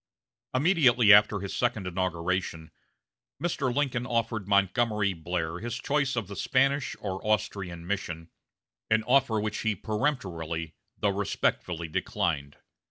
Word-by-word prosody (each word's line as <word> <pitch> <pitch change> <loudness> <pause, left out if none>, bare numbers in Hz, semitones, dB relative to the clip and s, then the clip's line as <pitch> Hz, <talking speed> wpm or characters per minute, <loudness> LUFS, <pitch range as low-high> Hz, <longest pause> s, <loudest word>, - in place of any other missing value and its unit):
Immediately 130 - +5
after 105 -1 +5
his 100 - -5
second 120 -5 0
inauguration, 90 -2 -2 0.7
Mr. 145 -7 -1
Lincoln 130 -2 -1
offered 115 -4 -1
Montgomery 100 +1 +2
Blair 85 0 -3
his 120 +2 -4
choice 140 0 0
of 115 -5 -2
the 100 - -7
Spanish 135 +3 +1
or 95 -2 -4
the - - -7
Austrian 100 -5 -1
mission, 85 -4 -4 0.6
an 110 0 +3
offer 125 -3 +3
which 105 0 -2
he 110 -2 0
peremptorily 85 - -2 0.2
though 105 - +1
respectfully 90 -4 -1
declined. 75 -2 -2
105 Hz, 125 wpm, -28 LUFS, 90-120 Hz, 0.7 s, Immediately